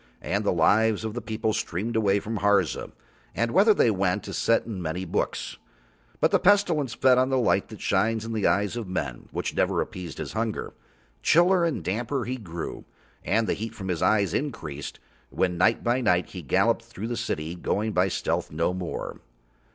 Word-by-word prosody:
And 100 +4 -1
the 100 - +2
lives 110 +6 +3
of 110 - -3
the 120 - -4
people 110 0 -2
streamed 105 +7 -2
away 100 -2 +3
from 110 +2 -4
Harza, 100 -5 +1 0.4
and 115 0 0
whither 205 - +5
they 120 - +4
went 95 -2 0
is - - -5
set 115 - +2
in 105 -5 -5
many 85 +3 -3
books. 85 - -2 0.6
But - - +3
the - - +4
Pestilence 175 - +3
fed 125 0 +4
on 130 +1 +2
the 135 - +2
light 115 -5 +2
that 110 - -11
shines 110 +3 +1
in 115 - -4
the 110 -3 +1
eyes 100 +2 +1
of 115 -4 -4
men, 70 -9 -4
which - - -3
never - - +1
appeased 90 -5 -5
his - - -5
hunger; 110 0 -3 0.5
chiller 175 +2 +4
and 165 -3 -1
damper 120 +6 -2
he 130 +2 -3
grew, 85 -7 -6 0.4
and 110 +3 +1
the - - +1
heat 110 +2 -5
from 95 -2 -6
his 90 -3 -1
eyes 100 -5 +2
increased 85 - -4 0.3
when 90 -1 0
night 110 +5 +3
by 120 +2 +1
night 90 -6 +2
he 90 - -7
galloped 70 - +2
through 105 +4 -7
the 120 - -2
city, 85 -9 -3
going 105 +5 -1
by 90 -1 +2
stealth 95 - -2
no 85 +3 0
more. 90 -2 -5
110 Hz, 195 wpm, -26 LUFS, 90-115 Hz, 0.6 s, whither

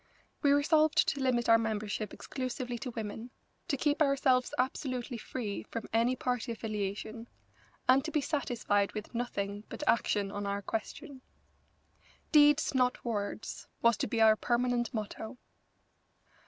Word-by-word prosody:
We 285 - +4
resolved 305 +2 +4
to 280 - -2
limit 250 -3 +1
our 230 0 +7
membership 215 -1 -2
exclusively 255 -2 -4
to 255 - -4
women, 225 0 -5 0.4
to 280 - 0
keep 295 +3 +1
ourselves 270 -3 +3
absolutely 255 -1 -2
free 215 -3 -4
from 230 -2 -5
any 235 +3 +3
party 245 -2 -2
affiliation, 215 +1 -4 0.6
and 260 +1 +5
to - - -2
be 305 - +2
satisfied 240 -8 0
with 215 +2 -6
nothing 205 -4 -3
but 295 - -6
action 205 -3 +2
on 205 0 -4
our 200 0 -2
question. 260 - -5 1.1
Deeds, 295 0 +5
not 250 -1 +1
words, 215 -2 -4 0.2
was 235 -1 +5
to - - -1
be 230 - -1
our 220 -1 +7
permanent 240 +1 0
motto. 220 +2 -5
240 Hz, 140 wpm, -31 LUFS, 215-260 Hz, 1.1 s, our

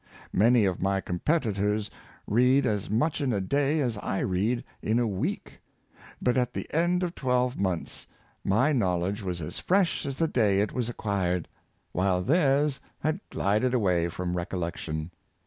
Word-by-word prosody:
Many 115 +2 +5
of 95 -3 -1
my 95 +1 +1
competitors 105 - 0 0.3
read 125 +5 +3
as 105 -3 -1
much 145 +9 +1
in 135 -3 +1
a 105 - +1
day 140 +9 +1
as 120 -6 -1
I 95 - -2
read 105 +7 0 0.2
in 110 +2 +1
a 120 - +2
week; 100 -4 -3 0.6
but, 125 0 +1
at 125 -1 +1
the - - -4
end 175 +3 +2
of 175 -1 -2
twelve 125 -2 0
months, 95 -4 -3 0.4
my 115 +10 +3
knowledge 95 - 0
was 90 -3 -3
as 75 - -5
fresh 185 -5 +1
as 135 -1 -4
the 165 - +2
day 105 -9 +2
it 105 - -1
was 120 -2 -1
acquired, 95 -7 -1 0.4
while 90 0 +1
theirs 145 - +2 0.2
had 155 +5 0
glided 110 +6 +1
away 90 -7 +2
from 90 +1 -3
recollection. 85 -2 -3
110 Hz, 160 wpm, -27 LUFS, 95-130 Hz, 0.6 s, Many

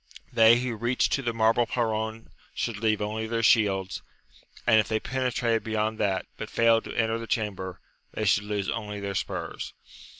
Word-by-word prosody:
They 115 +1 +7
who 125 -2 -2
reached 120 +3 +1
to 140 - +1
the 120 -3 -1
marble 115 +1 +2
perron 110 -1 -2 0.2
should 115 -3 -2
leave 110 -1 +1
only 110 +1 -3
their 115 0 -1
shields, 95 -4 +3 0.6
and 110 -2 +6
if 110 - +1
they 110 -1 0
penetrated 125 -2 0
beyond 110 0 -1
that, 95 -3 0
but - - -6
failed 115 -1 +3
to - - -7
enter 115 0 +1
the 115 - -7
chamber, 95 -5 -3 0.3
they 110 - -3
should 105 +1 +3
lose 105 -2 -2
only 105 -1 -3
their 100 0 -4
spurs. 95 - -4
110 Hz, 175 wpm, -27 LUFS, 105-115 Hz, 0.6 s, They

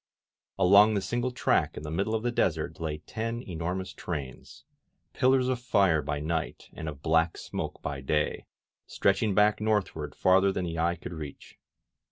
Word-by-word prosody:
Along 100 +4 +6
the 100 - +1
single 120 +6 -1
track 125 - +1
in - - -6
the 75 - -5
middle 100 +7 0
of 110 - -2
the 120 - 0
desert - - -1
lay 80 -2 -3
ten 115 +2 -4
enormous 90 0 -4
trains, 70 -7 -7 0.5
pillars 130 0 +3
of 130 -1 0
fire 100 -10 +3
by 75 0 -3
night 80 +1 -3
and 80 - -5
of 75 -2 -10
black 80 +1 +2
smoke - - -5
by 70 -2 -4
day, 75 +3 -1 0.4
stretching 100 +1 +1
back 105 +1 +4
northward 105 -2 -1
far 95 +1 +4
ther 100 0 +3
than 95 -1 -2
the 85 -1 -4
eye 85 +1 +1
could 85 +1 -8
reach. 75 -4 -9
95 Hz, 175 wpm, -28 LUFS, 80-110 Hz, 0.5 s, Along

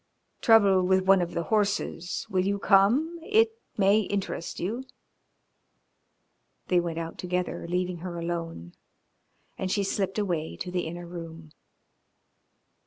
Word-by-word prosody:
"Trouble 200 -5 +6
with 185 +1 +2
one 190 -1 +6
of 175 -1 -3
the 170 - 0
horses. 200 -4 0
Will 185 -1 +1
you 200 +1 0
come? 235 - +3
It 440 +6 +3 0.3
may 200 +1 +5
interest 195 -4 -3
you." 225 +9 -3 1.9
They 180 - +4
went 170 -1 -3
out 165 0 -5
together, 180 -1 -2
leaving 180 0 -1
her 170 0 -6
alone, 165 - -4 0.9
and 190 - -2
she 200 -1 +1
slipped 195 0 -1
away 175 -6 -1
to 180 - -5
the 180 -2 -1
inner 175 +1 -6
room. 165 -2 -9
185 Hz, 130 wpm, -27 LUFS, 170-200 Hz, 1.9 s, Trouble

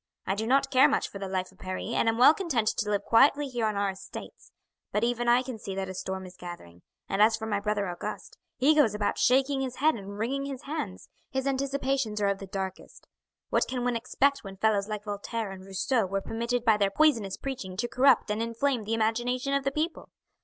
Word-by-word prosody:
I 190 - 0
do 220 +3 -3
not 275 +2 +3
care 270 +2 +6
much - - 0
for 200 - -9
the 195 - -4
life 185 -1 -2
of 190 - -24
Paris, 185 +4 -4
and 225 - +2
am 225 - 0
well 255 +5 +8
content 290 - -1
to 210 - -2
live 205 -1 0
quietly 280 +6 +4
here 240 -4 -1
on 215 - -1
our 200 -1 +1
estates; 190 0 -10 0.4
but 210 - 0
even 240 0 0
I 240 +1 +5
can 250 -4 -6
see 195 -2 -6
that 190 -1 -3
a - - -5
storm 190 0 -4
is 180 0 -12
gathering; 175 - -10 0.3
and 195 - 0
as 220 +1 +5
for 220 - -5
my 205 -2 0
brother 205 -1 -1
Auguste, 175 0 -6 0.2
he 280 +5 +5
goes 275 -9 +3
about 210 -1 -1
shaking 270 +2 +3
his 255 -2 -3
head 310 +3 +3
and 200 -1 -8
wringing 270 +6 -1
his 275 -2 -6
hands, 275 -11 -5 0.2
his 265 0 -2
anticipations 270 -4 -1
are 200 -1 +2
of 200 -1 -1
the 195 - -8
darkest. 190 0 -6 0.5
What - - +2
can 250 -1 -3
one 245 -1 0
expect 275 +4 +1
when 195 -1 -9
fellows 205 -1 +2
like 210 -1 -4
Voltaire 210 +1 -4
and 190 -1 -9
Rousseau 195 +3 0
were 195 +1 -1
permitted 235 +4 -2
by 220 -3 +5
their 200 -1 +2
poisonous 225 -5 +2
preaching 205 -9 -5
to 240 +4 -1
corrupt 255 -3 +4
and 210 +2 -1
inflame 230 +1 -1
the 225 +2 0
imagination 240 +4 0
of 275 0 +1
the 275 - 0
people? 315 +4 -3
225 Hz, 230 wpm, -28 LUFS, 200-265 Hz, 0.5 s, well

